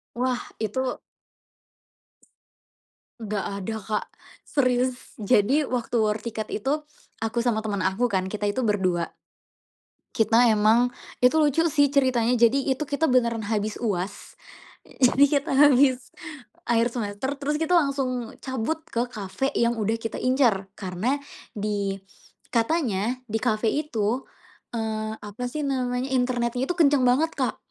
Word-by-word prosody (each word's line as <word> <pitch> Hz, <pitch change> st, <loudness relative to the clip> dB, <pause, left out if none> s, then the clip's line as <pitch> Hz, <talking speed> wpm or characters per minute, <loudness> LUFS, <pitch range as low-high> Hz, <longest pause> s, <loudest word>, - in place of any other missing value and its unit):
Wah, 250 Hz, 0 st, 0 dB, 0.2 s
itu 250 Hz, +4 st, -2 dB, 2.2 s
Ga 205 Hz, -2 st, -3 dB
ada 220 Hz, +3 st, -4 dB
Kak, 215 Hz, +1 st, -2 dB, 0.4 s
serius 255 Hz, -2 st, 0 dB
jadi 220 Hz, +8 st, +3 dB
waktu 245 Hz, -1 st, -2 dB
war 215 Hz, -1 st, +1 dB
tiket 220 Hz, -2 st, -5 dB
itu 295 Hz, +7 st, -1 dB, 0.3 s
aku 225 Hz, +2 st, -1 dB
sama 220 Hz, -2 st, 0 dB
temen 200 Hz, -3 st, -2 dB
aku 190 Hz, +7 st, +1 dB
kan 190 Hz, -5 st, 0 dB
kita 210 Hz, 0 st, -3 dB
itu 205 Hz, +6 st, 0 dB
berdua. 185 Hz, -6 st, 0 dB, 1.1 s
Kita 230 Hz, +2 st, +4 dB
emang 220 Hz, +3 st, +4 dB, 0.3 s
itu 250 Hz, +5 st, +4 dB
lucu 300 Hz, +2 st, +3 dB
sih 285 Hz, -3 st, +3 dB
ceritanya, 250 Hz, -3 st, +2 dB
jadi 265 Hz, +4 st, +3 dB
itu 300 Hz, -, -4 dB
kita 300 Hz, +3 st, +1 dB
beneran 235 Hz, -3 st, +2 dB
habis 210 Hz, 0 st, -1 dB
UAS, 195 Hz, -4 st, -3 dB, 0.5 s
jadi 270 Hz, +2 st, +4 dB
kita 285 Hz, -, -6 dB
habis 265 Hz, -2 st, +4 dB, 0.6 s
akhir 235 Hz, 0 st, +2 dB
semester 215 Hz, +2 st, -3 dB
terus 295 Hz, +1 st, -1 dB
kita 320 Hz, +2 st, -1 dB
langsung 265 Hz, -6 st, 0 dB
cabut 260 Hz, +5 st, -2 dB
ke 240 Hz, +1 st, 0 dB
cafe 210 Hz, +5 st, -3 dB
yang 235 Hz, 0 st, +2 dB
udah 215 Hz, +2 st, +1 dB
kita 225 Hz, -, -4 dB
incar 245 Hz, -7 st, +2 dB
karena 195 Hz, +7 st, -1 dB, 0.4 s
di 205 Hz, -1 st, -1 dB, 0.6 s
katanya 235 Hz, -, 0 dB
di 220 Hz, +1 st, -1 dB
cafe 220 Hz, -1 st, 0 dB
itu, 250 Hz, -5 st, -1 dB, 0.5 s
eee, 220 Hz, -1 st, -2 dB
apa 210 Hz, +4 st, -8 dB
sih 305 Hz, -1 st, -3 dB
namanya, 255 Hz, -1 st, -1 dB
internetnya 245 Hz, -1 st, 0 dB
itu 355 Hz, -, 0 dB
kenceng 285 Hz, -5 st, +4 dB
banget 305 Hz, +6 st, +3 dB
Kak, -, -, 0 dB
240 Hz, 130 wpm, -25 LUFS, 215-260 Hz, 2.2 s, Kita